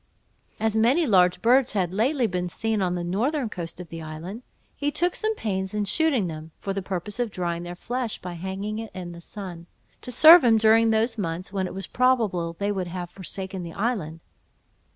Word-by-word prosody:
As 220 0 0
many 250 +10 +3
large 180 -7 +3
birds 250 +1 +4
had 185 -4 0
lately 250 +5 +1
been 180 -3 -2
seen 220 +3 -1
on 180 -1 0
the 175 - -3
northern 235 - -1
coast 170 -4 -7
of 180 -3 -8
the 165 +1 -7
island, 160 +8 -7 0.3
he 290 - -1
took 350 +4 0
some 435 0 -1
pains 190 - -3
in 210 -1 0
shooting 275 - +2
them, 160 -2 -6
for 195 - -3
the 195 - -2
purpose 190 +3 -5
of 240 -2 0
drying 170 -3 -3
their 175 0 -6
flesh 240 +4 -3
by 180 -1 -6
hanging 190 +5 -4
it 225 -1 -6
in 180 -2 -6
the 170 0 -10
sun, 175 -3 -7 0.3
to 250 - -5
serve 320 +5 +9
him 230 -2 +5
during 225 +1 +5
those 225 +1 +1
months 180 +1 -4
when 190 -2 -1
it - - -8
was 195 - -3
probable 220 -10 +1
they 200 0 -1
would 190 -3 -2
have 175 0 -6
forsaken 190 0 -5
the 170 -1 -7
island. 195 -8 -2
195 Hz, 205 wpm, -25 LUFS, 175-230 Hz, 0.3 s, serve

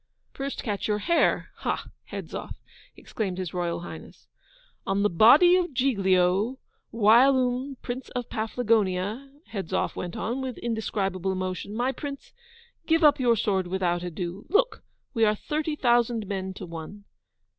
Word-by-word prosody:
'First 275 0 -4
catch 205 -3 -2
your 210 -1 +1
hare! 335 +11 +2
ha, - - -2 0.2
Hedzoff!' - - -6 0.4
exclaimed 195 -5 -4
His 185 -4 -4
Royal 175 -1 -2
Highness. 175 - -10 0.3
' - - -31
On 195 +1 +1
the 210 - +2
body 275 - +7
of 355 -6 0
GIGLIO, 200 -2 +2 0.3
whilome 250 +4 +4
Prince 245 +2 -5
of 245 -1 -2
Paflagonia' 220 +1 0 0.2
Hedzoff 190 -3 -2
went 175 -1 -5
on, 245 +4 -2
with 260 -2 -4
indescribable 195 -5 -2
emotion. 185 +2 -4
'My 245 +3 +1
Prince, 280 +1 -7 0.5
give 325 0 +3
up 295 -1 +6
your 240 -2 +4
sword 195 -4 0
without 175 -1 0
ado. 180 +2 -5
Look! 485 +7 +2 0.3
we 225 -3 +1
are 215 -1 +4
thirty 300 +6 -2
thousand 240 -4 +2
men 190 -1 -4
to 185 - -7
one! 170 +4 -8
220 Hz, 145 wpm, -26 LUFS, 190-260 Hz, 0.5 s, body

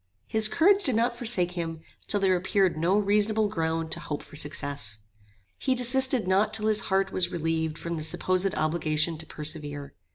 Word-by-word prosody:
His 220 -1 +4
courage 390 - +3
did 260 - 0
not 235 +2 +1
forsake 220 -8 +2
him 165 -2 -5 0.3
till 205 - +1
there 190 -2 +2
appeared 185 0 +1
no 170 +5 +1
reasonable 210 +1 +2
ground 165 -4 -2
to - - +2
hope 150 - -5
for - - -14
success. 145 -7 -3 0.6
He 260 - 0
desisted 255 -2 +3
not 195 +3 +2
till 215 - -1
his 215 -1 +2
heart 190 0 +1
was 180 -1 +1
relieved 160 -1 -2
from 170 - -5
the 160 -2 -4
supposed 185 +4 0
obligation 155 0 -1
to 160 - -4
persevere. 145 -2 -5
180 Hz, 175 wpm, -26 LUFS, 160-215 Hz, 0.6 s, His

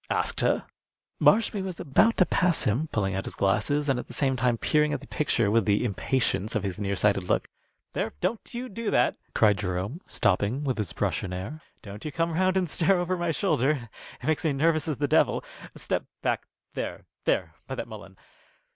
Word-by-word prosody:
"Asked - - 0
her?" - - +1 0.5
Marshby 210 -2 +4
was 185 -2 -5
about 220 +12 +3
to 185 - +5
pass 180 -2 +2
him, 125 +10 +1
pulling 95 -3 0
out 95 0 -2
his - - -6
glasses 145 +9 +1
and 135 -3 +2
at - - -7
the - - -7
same 135 -2 +2
time 120 -1 +1
peering 150 +4 +2
at 145 - -1
the 140 - -12
picture 120 -10 +1
with 115 -2 +3
the 105 +3 +2
impatience 110 -1 0
of 110 - 0
his 95 -2 -3
near 100 -1 -1
sighted 100 0 +2
look. 90 - 0 0.5
"There, - - -2
don't 230 - -2
you 245 +1 -4
do 230 0 -4
that!" - - +2 0.2
cried 105 -2 +4
Jerome, 100 - -3
stopping, 100 +7 +1
with 130 -5 -1
his 100 -5 -2
brush 100 +2 -1
in 95 - -4
air. 100 +13 -5 0.2
"Don't 100 0 -9
you 155 - -4
come 165 +2 0
round 185 +2 +2
and 185 -2 +1
stare 180 +5 +2
over 175 +1 0
my 175 -1 -1
shoulder. 135 -3 +1 0.3
It - - -10
makes 155 0 +1
me 155 -3 +2
nervous 155 +3 +2
ad 150 - -1
the 145 - 0
devil. 155 - +3 0.3
Step - - -2 0.2
back - - 0 0.3
there - - -5 0.2
there - - +1
by - - -4
that - - -4
mullein. - - -11
135 Hz, 210 wpm, -27 LUFS, 105-165 Hz, 0.5 s, to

